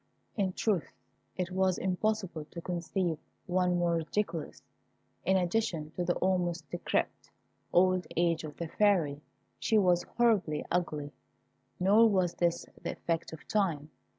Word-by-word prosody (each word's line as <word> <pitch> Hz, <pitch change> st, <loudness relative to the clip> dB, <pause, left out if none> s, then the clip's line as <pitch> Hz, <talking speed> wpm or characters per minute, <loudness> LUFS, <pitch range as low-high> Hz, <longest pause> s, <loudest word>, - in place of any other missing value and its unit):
In 195 Hz, -4 st, 0 dB
truth 195 Hz, -7 st, 0 dB, 0.4 s
it 180 Hz, 0 st, -2 dB
was 185 Hz, -1 st, +2 dB
impossible 190 Hz, -3 st, -1 dB
to 170 Hz, -, -9 dB
conceive 175 Hz, -1 st, -2 dB, 0.3 s
one 180 Hz, -1 st, +2 dB
more 175 Hz, -1 st, +2 dB
ridiculous. 165 Hz, 0 st, -3 dB, 0.6 s
In 190 Hz, +1 st, +4 dB
addition 175 Hz, -4 st, 0 dB
to 180 Hz, -, -3 dB
the 175 Hz, 0 st, +1 dB
almost 175 Hz, -4 st, 0 dB
decrepit 175 Hz, -, -2 dB, 0.4 s
old 185 Hz, -1 st, +3 dB
age 170 Hz, -1 st, +2 dB
of 150 Hz, -1 st, -8 dB
the 170 Hz, -, -3 dB
Fairy, 165 Hz, -7 st, +2 dB, 0.4 s
she 220 Hz, -, +2 dB
was 180 Hz, -4 st, +4 dB, 0.2 s
horribly 205 Hz, -11 st, +2 dB
ugly. 150 Hz, -5 st, -1 dB, 0.7 s
Nor 210 Hz, +5 st, +6 dB
was 185 Hz, -4 st, +2 dB
this 170 Hz, -1 st, 0 dB, 0.2 s
the -, -, -3 dB
effect 165 Hz, -1 st, -2 dB
of 160 Hz, -, -11 dB
time. 165 Hz, -8 st, 0 dB
175 Hz, 135 wpm, -31 LUFS, 165-190 Hz, 0.7 s, Nor